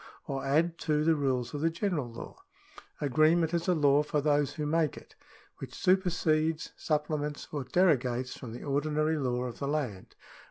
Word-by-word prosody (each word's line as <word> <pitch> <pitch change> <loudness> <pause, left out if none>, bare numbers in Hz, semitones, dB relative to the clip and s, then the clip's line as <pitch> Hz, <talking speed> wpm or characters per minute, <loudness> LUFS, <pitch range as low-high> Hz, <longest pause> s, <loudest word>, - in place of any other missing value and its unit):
or 135 -1 -4
add 165 +5 +1
to 150 -1 +1
the 165 +1 +4
rules 130 -4 -1
of 145 - -4
the 165 - +3
general 165 - -2
law. 115 - -9 0.6
Agreement 155 +4 +3
is 170 0 -1
a 180 - +3
law 145 -2 +4
for 150 0 -1
those 145 -1 +1
who 150 - -3
make 155 -1 +1
it, - - -13 0.5
which - - -8
supersedes, 165 -4 +1
supplements, 150 -1 -2
or 145 -3 -3
derogates 130 -5 +1
from 125 -4 -8
the 120 - -8
ordinary 155 +2 0
law 125 -2 -1
of 125 -2 -6
the 140 - -2
land. 130 -11 -3
150 Hz, 170 wpm, -30 LUFS, 135-160 Hz, 0.6 s, the